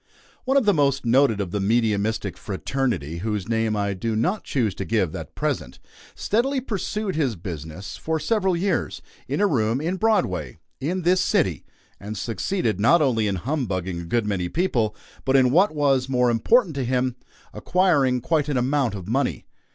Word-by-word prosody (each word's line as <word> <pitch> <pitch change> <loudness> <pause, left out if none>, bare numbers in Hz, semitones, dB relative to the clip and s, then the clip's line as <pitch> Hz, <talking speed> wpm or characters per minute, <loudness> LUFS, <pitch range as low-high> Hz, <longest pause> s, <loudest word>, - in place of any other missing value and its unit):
One 270 +2 +3
of 270 - +3
the 205 - +5
most 140 -4 +1
noted 120 -2 +3
of 95 -4 -3
the 105 - -1
mediumistic 110 0 0
fraternity 100 - -3
whose 105 -1 -3
name 115 -1 0
I 100 -1 0
do 110 +4 -2
not 180 - 0
choose 115 -8 0
to 95 - -5
give 95 -6 0
at - - -8
present - - -2 0.4
steadily 265 +6 0
pursued 210 - -3
his 135 -8 0
business, 85 +1 -7
for 160 0 -2
several 190 +2 +1
years, 195 +3 -1 0.2
in - - -2
a 205 - +4
room 115 - +1
in 170 +5 -2
Broadway, 90 - 0 0.2
in 175 +6 -2
this 185 +2 +3
city, 155 - 0 0.3
and 105 +2 -6
succeeded 115 - -1
not 120 +11 +5
only 120 -8 +2
in 100 - 0
humbugging 95 - -2
a - - -8
good 115 +6 0
many 95 -4 -1
people, 120 - 0 0.3
but 135 - +1
in 130 -2 +5
what 185 +8 +5
was 135 -4 +1
more 125 -2 +3
important 180 - +3
to 135 - 0
him 125 0 0 0.4
acquiring 145 -9 +2
quite 150 +2 0
an 140 - 0
amount 130 -3 +1
of 95 -2 -8
money. 130 +4 -1
125 Hz, 175 wpm, -23 LUFS, 105-165 Hz, 0.4 s, the